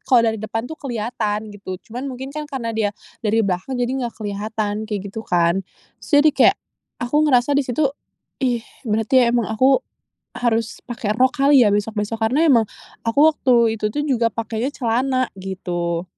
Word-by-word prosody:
jepit - - -40
kalo 250 -2 +6
dari 220 0 0
depan 225 +1 -3
tuh 315 - -8
kelihatan 225 -5 -2
gitu, 195 -2 -7
cuman 245 +3 -5
mungkin 265 +1 -6
kan 305 +1 -4
karena 260 -6 -3
dia 215 -2 0 0.3
dari 220 -1 +1
belakang 190 +7 -2
jadi 245 0 0
enggak 250 -3 -3
kelihatan 210 0 -3
kayak 210 -2 -2
gitu 220 - -5
kan 170 -4 +2 0.5
terus - - -12
dia 310 - +6
kayak - - +5 0.5
aku 245 +5 -1
ngerasa 250 +1 +3
di 285 - +3
situ, 260 +4 0 0.6
"Ih 245 -3 0 0.2
berarti 225 +3 +3
emang 235 -2 +1
aku 260 +5 +4 0.6
harus 230 -2 -1
pake 240 -3 -3
rok 255 +2 +4
kali 275 -2 +6
ya 210 - +3
besok-besok?" 210 +1 -1
karena 250 +8 +2
emang 235 -7 +5 0.4
aku 230 +4 +1
waktu 260 -4 +1 0.3
itu 210 - +1
tuh 295 - -1
juga 250 -6 +2
pakenya 230 +2 -2
celana 255 +1 0
gitu. 175 -3 -3
230 Hz, 175 wpm, -21 LUFS, 210-255 Hz, 0.6 s, kalo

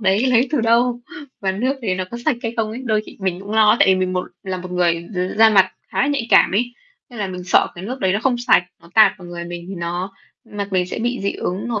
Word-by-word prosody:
đấy 200 +4 +2
lấy 250 0 +3
từ 295 - +2
đâu, 235 +2 +2 0.4
và 190 -1 0
nước 250 +8 -1
đấy 195 -5 0
nó 185 0 -3
có 235 - -6
sạch - - +2
hay 230 - -3
không 225 -1 0
ấy. 240 +4 -7
Đôi 215 -2 +1
khi - - -12
mình 185 -1 -2
cũng 200 - -9
lo, 220 0 +5
tại - - +5
vì 190 - +6
mình 185 0 -1
một 180 0 -2 0.2
là 190 -1 -4
một 180 0 -8
người 170 -1 0
d - - -3 0.2
da 225 0 +7
mặt 190 -3 +4 0.2
khá - - -2
là 275 - +2
nhạy 280 -5 -1
cảm - - +6
ấy, 240 +6 0 0.4
nên 240 - -10
là 205 - -1
mình 180 -1 -7
sợ 180 - +4
cái 175 +2 -8
nước 255 +5 -5
đấy 190 -1 +2
nó 200 - +1
không 250 -2 +1
sạch, 240 -6 +3 0.2
nó 170 - -17
tạt 220 -1 +7
vào 175 -2 -11
người 170 0 -6
mình 175 0 -7
thì 195 - -6
nó 175 +2 -4 0.3
mặt 200 -1 -5
mình 180 -1 +1
sẽ - - -5
bị 245 +2 -2
dị 200 - 0
ứng 190 +6 -4
nổi 225 -3 -2
200 Hz, 290 wpm, -20 LUFS, 185-235 Hz, 0.4 s, da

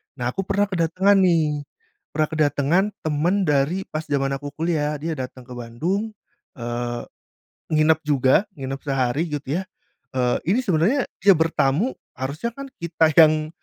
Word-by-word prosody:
Nah, 125 -2 -2
aku 195 +5 -3
pernah 200 +1 +2
kedatangan 185 +4 +3
nih, 155 -5 +2 0.5
pernah 155 0 +2
kedatangan 150 +3 +2 0.2
teman 165 +6 +1
dari 150 +4 +1
pas 155 +1 -4
jaman 140 -2 0
aku 145 0 -8
kuliah. 155 -2 0
Dia 165 +2 -2
datang 130 0 -6
ke 125 - -16
Bandung, 175 - -2 0.4
eee, 120 0 -4 0.7
nginep 155 0 +4
juga, 135 +4 +3
nginep 135 -2 -5
sehari 135 +2 0
gitu 145 -2 -4
ya. - - -4 0.5
Eee, 125 -1 +1
ini 220 +8 +3
sebenarnya 200 - +1
dia 195 +1 +7
bertamu, 160 - +1 0.2
harusnya 145 - -3
kan 275 0 -7
kita 165 -2 +2
yang, 155 -1 +6
155 Hz, 145 wpm, -23 LUFS, 135-175 Hz, 0.7 s, dia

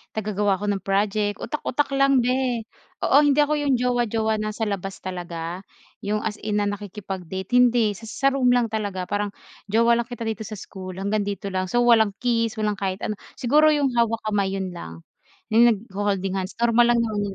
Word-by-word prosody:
taga-gawa 205 -2 0
ako 205 +2 -2
ng 200 - -1
project, 205 +1 +1
utak-utak 290 -2 -2
lang 275 -2 +3
be. 250 -2 0 0.4
Oo 275 - +5
hindi 290 0 +4
ako 300 +1 0
iyong 285 -2 +2
jowa-jowa 230 -3 0
na 215 0 -3
sa 225 - -2
labas 195 -2 -4
talaga 175 -2 -5 0.4
yung 210 +1 -2
as 210 -1 -3
in 210 -1 -1
na - - 0
nakikipag-date 190 -2 -6
hindi, 240 -3 +4
sa 205 +3 -10
sa 270 +5 0
room 265 -2 +1
lang 235 -3 +1
talaga 205 -4 -2
parang 205 +2 -3 0.3
jowa 230 +3 +3
lang 235 - -2
kita 240 -2 -6
dito 220 -2 -4
sa 215 - -6
school 185 -2 -8
hanggang 200 +2 -1
dito 200 -1 -4
lang. 185 0 -1
So 240 +5 +2
walang 220 -4 +4
kiss, 230 -2 +1
walang 210 -2 -1
kahit 190 0 -3
ano, 215 -2 -3 0.2
siguro 295 +5 +4
yung 290 -3 +3
hawak 230 -1 +1
kamay, 195 -2 0
yun 190 -1 -3
lang. 80 - -9 0.5
Yung 230 +2 +6
nagho-holding 195 -3 -1
hands 185 +1 -5
normal 235 0 +4
lang - - +2
naman 215 -2 -2
yun 205 0 -1
215 Hz, 195 wpm, -23 LUFS, 195-235 Hz, 0.5 s, Yung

